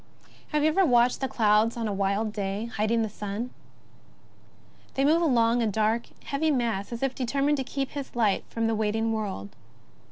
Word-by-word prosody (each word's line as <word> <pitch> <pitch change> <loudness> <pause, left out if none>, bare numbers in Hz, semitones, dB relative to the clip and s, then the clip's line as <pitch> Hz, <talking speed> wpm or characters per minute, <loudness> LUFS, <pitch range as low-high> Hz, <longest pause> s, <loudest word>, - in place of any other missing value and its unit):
Have 300 -1 0
you 310 - +5
ever 380 +5 +3
watched 245 -5 +3
the 265 - +1
clouds 220 0 +2
on 230 -1 -2
a 205 - -2
wild 200 +2 0
day 205 +2 -3
hid 215 +1 0
ing 230 0 +2
the - - -1
sun? 210 +3 -5 1.4
They 270 - +2
move 320 +4 +4
along, 240 -6 +3
a 230 - +2
dark, 220 +2 0 0.2
heavy 300 +3 0
mass, 235 -8 -1
as 235 +2 -4
if 270 -1 +1
determined 275 +4 0
to 265 - -1
keep 270 +1 -3
his 280 -3 -6
light 215 -5 +2
from 230 0 -2
the 225 - +1
waiting 220 +1 0
world. 195 - -4
230 Hz, 190 wpm, -27 LUFS, 215-265 Hz, 1.4 s, you